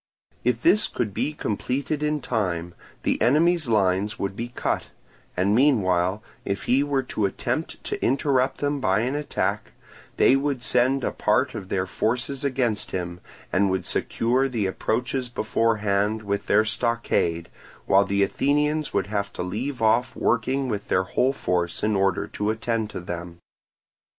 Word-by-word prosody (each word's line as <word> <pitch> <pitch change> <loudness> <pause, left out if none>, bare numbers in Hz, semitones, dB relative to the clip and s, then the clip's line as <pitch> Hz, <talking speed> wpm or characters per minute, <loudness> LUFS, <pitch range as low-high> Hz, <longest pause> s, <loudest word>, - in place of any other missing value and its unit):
If 120 -1 0
this 195 +5 +5
could 105 -4 -3
be 150 - -1
completed 140 +3 -2
in 150 -1 0
time, 90 -8 -2 0.3
the - - 0
enemy's 155 +6 +3
lines 100 -1 +1
would 95 -1 -3
be 115 +3 -4
cut; 120 - -2 0.5
and 95 +3 +2
meanwhile, 100 -7 +2 0.2
if 100 -1 -3
he 130 +3 +3
were 140 -2 0
to 110 -5 -1
attempt 95 - -3
to - - -4
interrupt 130 0 +1
them 145 0 0
by 100 -4 +2
an 125 +3 -1
attack, 150 0 -2 0.4
they 130 - +6
would 135 -2 -1
send 130 +2 +2
a - - 0
part 130 +5 +1
of 100 -4 -7
their 95 -1 0
forces 125 +8 -1
against 125 -6 0
him, 90 -1 -4 0.3
and 100 +1 +3
would 95 0 -1
secure 125 +4 +1
the 115 -6 -1
approaches 120 +6 -1
beforehand 110 -2 0
with 100 0 -2
their 105 +1 +4
stockade, 110 -7 0 0.4
while 100 +1 +5
the 100 0 +1
Athenians 150 +8 0
would - - +2
have 100 -1 -2
to - - -4
leave 115 +7 -3
off 115 +3 +2
working 130 +4 +1
with 105 -4 -3
their 90 - +2
whole 125 +7 +1
force 90 -9 -1
in 105 0 +2
order 95 -2 +1
to 105 0 -3
attend 110 0 -1
to - - -6
them. 85 -1 -6
110 Hz, 160 wpm, -24 LUFS, 100-130 Hz, 0.5 s, they